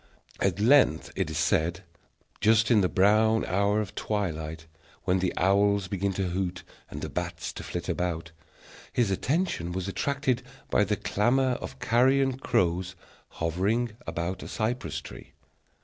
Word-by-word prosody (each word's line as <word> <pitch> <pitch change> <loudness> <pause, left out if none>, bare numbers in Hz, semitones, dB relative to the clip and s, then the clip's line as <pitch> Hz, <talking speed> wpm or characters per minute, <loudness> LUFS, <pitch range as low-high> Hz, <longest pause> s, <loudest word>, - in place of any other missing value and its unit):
At - - 0
length, 110 - +4
it - - -1
is 80 - -4
said, 85 +3 +1 0.6
just 110 +2 +4
in 110 -3 +6
the 90 - +2
brown 110 +3 +3
hour 100 +3 +1
of 105 - -6
twilight, 80 -6 -3 0.4
when 90 +1 +2
the 90 0 0
owls 100 +1 +3
began 100 +1 -1
to 95 -1 -1
hoot 90 0 -3 0.3
and - - -7
the - - -2
bats - - -4
to - - -7
flit - - -5
about, 85 -2 -2 0.6
his 115 -5 +1
attention 130 - -1
was 95 +1 -3
attracted 130 +5 0 0.3
by 105 - +4
the 105 - 0
clamor 120 +6 +2
of 130 - -7
carrion 130 +2 +2
crows 90 -7 0 0.3
hovering 100 +9 0 0.2
about 85 +3 -3
a - - -7
cypress 120 +3 -2
tree. - - -12
100 Hz, 150 wpm, -27 LUFS, 90-115 Hz, 0.6 s, in